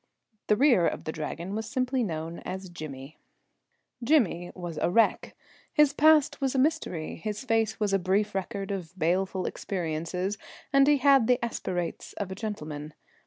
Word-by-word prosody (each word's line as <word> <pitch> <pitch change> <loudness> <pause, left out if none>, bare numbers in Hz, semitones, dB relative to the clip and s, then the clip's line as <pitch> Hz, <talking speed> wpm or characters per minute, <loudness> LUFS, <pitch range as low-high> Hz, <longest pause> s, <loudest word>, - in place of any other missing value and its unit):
The 210 - +4
rear 240 - +4
of - - -3
the 155 - -3
Dragon 170 +4 -5
was 220 +1 -3
simply 255 0 0
known 165 -3 -4
as 190 0 -6
Jimmy. 150 -3 -8 0.8
Jimmy 230 - +2
was 175 -4 -6
a - - +1
wreck. 225 +5 +2 0.4
His 300 -2 +4
past 305 -1 +4
was 270 -1 0
a - - +2
mystery. 260 - 0
His 210 +6 -4
face 225 -2 +1
was 205 -2 0
a 195 - +4
brief 200 +3 +1
record 195 +1 -3
of 185 -2 -5
baleful 185 +2 0
experiences, 180 +2 -3 0.3
and 275 0 +6
he 295 0 +5
had 270 -3 +5
the 250 - +4
aspirates 175 -7 -4
of 200 -2 -5
a - - -4
gentleman. 155 -8 -6
195 Hz, 165 wpm, -28 LUFS, 170-250 Hz, 0.8 s, and